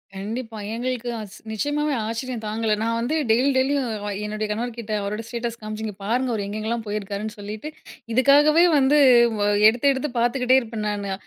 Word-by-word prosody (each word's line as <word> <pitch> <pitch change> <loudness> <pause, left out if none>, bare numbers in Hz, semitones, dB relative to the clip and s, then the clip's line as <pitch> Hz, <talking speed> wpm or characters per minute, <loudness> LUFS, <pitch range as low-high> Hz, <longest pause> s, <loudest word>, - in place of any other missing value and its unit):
கண்டிப்பா. 225 +3 -5 0.2
எங்களுக்கு 245 0 -3
அஸ் 205 -3 -9
நிச்சயமாவே 290 +6 -1
ஆச்சரியம் 230 0 -4
தாங்கல. 220 0 0
நான் 230 +1 0
வந்து 245 +7 -1 0.2
டெய்லி, 250 +5 +3
டெய்லியும் 270 0 +1 0.4
என்னுடைய 215 0 -3
கணவர் 230 +2 -3
கிட்ட 220 -2 -7
அவரோட 210 +2 -3
ஸ்டேட்டஸ் 235 -1 -4
காமிச்சு, 215 +1 -5
இங்க 210 - -5
பாருங்க 245 +5 0
அவர் 205 -3 -2
எங்கெங்கெல்லாம் 220 +2 -3
போயிருக்காருன்னு 210 +1 -4
சொல்லிட்டு 210 +7 -6 0.4
இதுக்காகவே 290 +6 +5
வந்து 280 +2 +4 0.4
வ - - -2 0.3
எடுத்து 245 +5 +3
எடுத்து 270 +2 -3
பார்த்துக்கிட்டே 250 +2 +3
இருப்பேன் 220 -2 -5
நானு. 200 -1 -3
230 Hz, 160 wpm, -23 LUFS, 215-255 Hz, 0.4 s, இதுக்காகவே